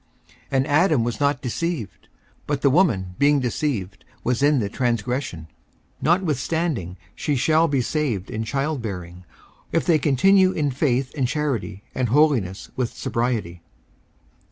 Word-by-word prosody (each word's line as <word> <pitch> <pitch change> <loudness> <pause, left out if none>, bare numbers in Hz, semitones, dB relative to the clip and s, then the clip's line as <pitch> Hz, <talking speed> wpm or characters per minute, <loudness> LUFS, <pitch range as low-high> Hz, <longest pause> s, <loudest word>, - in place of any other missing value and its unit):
54:002:014 - - -27 0.2
And 135 +1 +2
Adam 155 -3 +3
was 115 -2 -3
not 140 -3 +1
deceived, 130 - -4 0.4
but 145 -2 -2
the 140 - +5
woman 115 - +2
being 145 0 +4
deceived 120 - -2 0.2
was 125 +1 0
in 145 0 +4
the 105 - -1
transgression. 120 - -2
54:002:015 - - -15 0.5
Notwithstanding 160 - 0 0.2
she 150 - -1
shall 160 +5 +3
be 140 -4 +1
saved 120 - -2
in 110 +1 -2
childbearing, 110 - -4 0.5
if 165 - +1
they 165 -3 +4
continue 185 +7 +4
in 145 -3 0
faith 130 -1 0
and 135 -4 +1
charity 130 -8 -2
and 125 -3 -1
holiness 125 -9 +2
with 125 -3 -3
sobriety. 115 -8 -2
130 Hz, 140 wpm, -23 LUFS, 110-150 Hz, 0.5 s, the